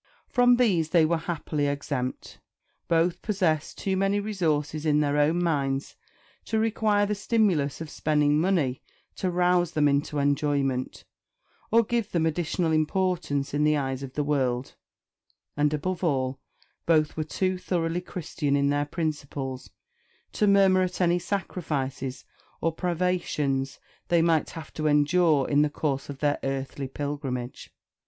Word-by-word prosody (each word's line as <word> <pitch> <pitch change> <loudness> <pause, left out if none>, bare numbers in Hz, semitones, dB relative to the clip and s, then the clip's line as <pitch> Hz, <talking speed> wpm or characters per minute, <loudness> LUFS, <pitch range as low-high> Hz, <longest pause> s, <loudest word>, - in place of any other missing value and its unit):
From 245 -1 +4
these 190 -10 +2
they 165 -2 +4
were 165 +1 +1
happily 150 -3 -1
exempt. 140 -3 -4 0.5
Both 165 +1 +1
possessed 180 -8 0
too 190 -1 -1
many 195 +2 +1
resources 160 -7 -1
in 150 -2 +3
their 145 -1 +1
own 155 +4 +2
minds 140 -4 -1 0.5
to 220 - -1
require 215 -2 +2
the 210 - -1
stimulus 195 - +1
of 165 - -5
spending 150 0 +2
money 160 -9 +1 0.4
to 185 - -1
rouse 175 -1 +2
them 150 -2 +3
into 145 +1 0
enjoyment, 140 -2 0 0.6
or 230 +1 +5
give 230 -1 -2
them 165 -2 +2
additional 165 +1 0
importance 155 -3 0
in 145 +1 +1
the 150 0 +3
eyes 135 -2 -2
of 135 -1 -7
the 150 - -1
world; 130 -3 -1 0.8
and, 150 0 +2
above 180 +5 -2
all, 135 -5 0 0.5
both 155 -2 +3
were 155 - -1
too 185 +4 -1
thoroughly 170 -1 -1
Christian 150 -5 -2
in 140 0 +2
their 145 0 +1
principles 145 -4 -4 0.6
to 210 - +1
murmur 195 -2 +5
at 180 0 -2
any 175 -1 +3
sacrifices 140 -9 -3 0.3
or 165 - +1
privations 160 -6 -1 0.3
they 170 -1 +3
might 165 -2 +2
have 160 -3 -9
to 155 0 -1
endure 150 0 +3
in 145 0 +3
the 150 - +2
course 145 -2 -2
of 140 -1 -8
their 145 -1 +1
earthly 135 0 -3
pilgrimage. 135 -3 -5
155 Hz, 145 wpm, -26 LUFS, 145-180 Hz, 0.8 s, or